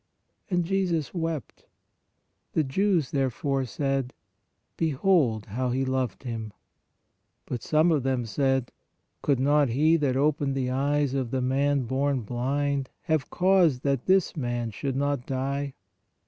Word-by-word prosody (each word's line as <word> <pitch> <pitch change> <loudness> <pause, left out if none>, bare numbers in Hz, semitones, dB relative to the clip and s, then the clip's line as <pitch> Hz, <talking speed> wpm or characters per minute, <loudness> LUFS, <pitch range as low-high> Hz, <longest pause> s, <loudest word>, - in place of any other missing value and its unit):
And 175 -3 +1
Jesus 180 -5 0
wept. 165 -5 -4 0.9
The 160 - +2
Jews 170 +1 +1
therefore 135 0 0
said: 135 0 -2 0.6
Behold 150 - +2
how 125 +5 -2
He 130 +2 0
loved 130 -1 -2
him. 115 -4 -5 0.9
But 120 - -4
some 155 +2 +3
of 150 -3 +2
them 130 -2 0
said: 135 +2 0 0.5
Could 140 -4 +1
not 145 0 +3
He 155 +7 +3
that 135 -4 0
opened 145 -1 +1
the 130 -2 -1
eyes 140 +1 +1
of 130 -3 -1
the 130 - -1
man 135 +2 +1
born 135 +2 0
blind, 135 +4 -1
have 155 -5 0
caused 180 -8 +3
that 140 -3 0
this 190 -1 +3
man 120 -5 -2
should 135 +6 -3
not 140 -2 -1
die? 135 +1 -2
135 Hz, 135 wpm, -27 LUFS, 130-150 Hz, 0.9 s, some